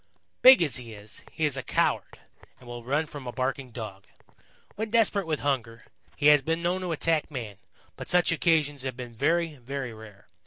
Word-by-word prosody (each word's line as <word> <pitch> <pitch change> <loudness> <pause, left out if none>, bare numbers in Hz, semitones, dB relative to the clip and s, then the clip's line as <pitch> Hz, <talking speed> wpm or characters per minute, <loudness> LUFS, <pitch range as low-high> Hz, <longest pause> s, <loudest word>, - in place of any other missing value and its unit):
"Big 255 -7 +9
as 145 - -1
he 120 -3 -9
is, 105 +1 -10
he 160 - -1
is 145 -3 +1
a 130 - -2
coward - - 0 0.4
and 125 - -16
will 120 -1 -7
run 145 +6 0
from 145 -4 -9
a - - -3
barking 130 +1 -2
Dog. 110 -5 -8 0.7
When 220 +1 -4
desperate 210 -4 +2
with 155 -2 -1
hunger, 120 -5 -2 0.3
he 145 - -3
has 150 -1 +7
been 165 +4 -2
known 180 +2 0
to 180 -2 -3
attack 160 0 0
man, 115 -9 -6 0.4
but - - -7
such 180 -1 +3
occasions 155 -4 +1
have 130 -2 -4
been 120 -2 -7
very, 160 +5 0
very 130 -1 -5
rare. 110 -2 -13
140 Hz, 195 wpm, -27 LUFS, 120-165 Hz, 0.7 s, Big